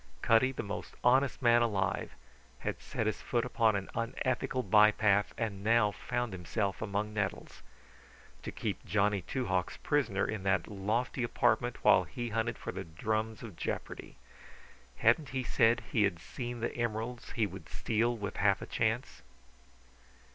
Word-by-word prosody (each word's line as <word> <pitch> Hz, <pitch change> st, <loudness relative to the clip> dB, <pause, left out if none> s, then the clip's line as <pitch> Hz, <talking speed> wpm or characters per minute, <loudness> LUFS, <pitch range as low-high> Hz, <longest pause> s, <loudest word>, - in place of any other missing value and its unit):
Cutty, 115 Hz, +3 st, +4 dB
the 130 Hz, -, -4 dB
most 100 Hz, 0 st, -6 dB
honest 130 Hz, +2 st, +3 dB
man 120 Hz, 0 st, +6 dB
alive, 105 Hz, -5 st, 0 dB, 0.5 s
had -, -, -3 dB
set 110 Hz, -, -3 dB
his 110 Hz, -, -1 dB
foot 120 Hz, -1 st, 0 dB
upon 115 Hz, -3 st, +2 dB
an 95 Hz, -1 st, -2 dB
unethical 130 Hz, +2 st, -1 dB
bypath 105 Hz, 0 st, +4 dB
and 100 Hz, -4 st, -3 dB
now 110 Hz, -1 st, +4 dB
found 120 Hz, +1 st, -3 dB
himself 95 Hz, +2 st, -2 dB
among 105 Hz, 0 st, -2 dB
nettles. 105 Hz, -3 st, -3 dB, 0.8 s
To -, -, -5 dB
keep -, -, -4 dB
Johnny 100 Hz, -1 st, +1 dB
Two 130 Hz, -, -3 dB
Hawks 90 Hz, -3 st, -1 dB
prisoner -, -, 0 dB
in 110 Hz, -2 st, -3 dB
that 95 Hz, -2 st, +1 dB
lofty 110 Hz, +6 st, -1 dB
apartment 120 Hz, 0 st, +1 dB
while 90 Hz, -, +6 dB
he 120 Hz, +10 st, -5 dB
hunted 115 Hz, +1 st, -1 dB
for -, -, -5 dB
the 95 Hz, +1 st, -5 dB
drums 110 Hz, +7 st, -3 dB
of 105 Hz, -6 st, -8 dB
jeopardy! -, -, -5 dB, 0.8 s
Hadn't 130 Hz, +6 st, +3 dB
he 130 Hz, -, -1 dB
said 115 Hz, 0 st, +3 dB
he 110 Hz, -, +2 dB
had 100 Hz, -4 st, +2 dB
seen 120 Hz, +6 st, -6 dB
emeralds 120 Hz, +1 st, -3 dB
he 115 Hz, -3 st, +1 dB
would 95 Hz, -4 st, -9 dB
steal 120 Hz, +1 st, 0 dB
with 100 Hz, -2 st, -5 dB
half 100 Hz, -1 st, +3 dB
a -, -, -5 dB
chance? -, -, -1 dB
110 Hz, 155 wpm, -32 LUFS, 100-120 Hz, 0.8 s, man